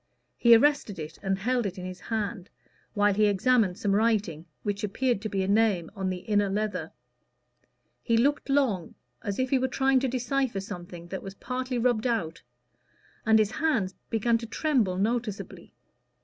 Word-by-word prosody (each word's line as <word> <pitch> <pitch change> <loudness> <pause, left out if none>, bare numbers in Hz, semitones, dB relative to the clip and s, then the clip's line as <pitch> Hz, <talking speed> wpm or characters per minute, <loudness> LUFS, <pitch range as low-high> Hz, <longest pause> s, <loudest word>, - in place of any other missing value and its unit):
He 235 -1 +7
arrested 260 -5 +2
it 155 0 -7
and 195 -1 0
held 240 +2 0
it 190 0 -7
in 180 - -6
his 185 0 -7
hand, 210 -4 -4 0.5
while 205 0 +3
he 210 +1 +3
examined 205 -1 +2
some 205 -3 -1
writing, 200 -7 +1 0.2
which 205 -1 -2
appeared 235 +2 0
to 215 - -3
be 195 -2 -1
a - - -2
name 200 -5 +2
on 190 -2 -2
the 180 -1 -4
inner 205 -1 +1
leather. 195 -5 -2 1.1
He 230 - +1
looked 285 +5 +1
long, 255 - +1 0.3
as 200 -1 -3
if 255 0 -1
he 270 - +4
were 260 - +1
trying 265 +1 +2
to 265 - 0
decipher 255 -2 -1
something 175 -3 -8
that 190 - -5
was 195 0 -8
partly 255 +3 -3
rubbed 240 -1 +1
out; 175 -9 -2 0.9
and 220 0 +6
his 215 -1 +2
hands 240 -9 0 0.2
began 230 +1 +1
to 230 - -7
tremble 225 - +1
noticeably. 220 0 -3
215 Hz, 175 wpm, -27 LUFS, 190-245 Hz, 1.1 s, He